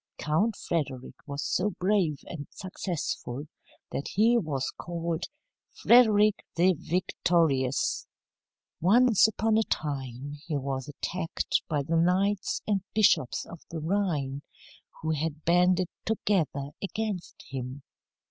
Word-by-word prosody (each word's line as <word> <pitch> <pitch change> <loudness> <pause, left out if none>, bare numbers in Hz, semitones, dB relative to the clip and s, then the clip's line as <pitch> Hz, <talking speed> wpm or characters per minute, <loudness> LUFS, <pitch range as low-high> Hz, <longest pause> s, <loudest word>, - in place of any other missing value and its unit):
Count 190 +9 +1
Frederick 135 -9 -3
was 140 0 -3
so 200 +3 +1
brave 180 -6 +1
and 145 -5 -7
successful 170 -8 -4 0.5
that 140 - -3
he 225 +5 +3
was 150 - 0
called 170 -1 -3 0.4
"Frederick 215 -4 +5
the 180 +3 +4
Victorious." 160 -5 +1 0.7
Once 225 +4 +5
upon 220 0 +1
a - - +3
time 140 -1 -3
he 155 -4 0
was 135 -1 -3
attacked 165 +4 -2
by 150 -3 0
the 165 +4 0
knights 190 +4 +1
and 200 -2 +1
bishops 205 - +3
of 170 - -11
the 165 - -5
Rhine, 155 -6 -1 0.6
who 160 - 0
had 155 0 -2
banded 180 +1 +4 0.2
together 160 -10 0
against 200 -2 -4
him. 130 +1 -5
170 Hz, 115 wpm, -28 LUFS, 145-195 Hz, 0.7 s, Frederick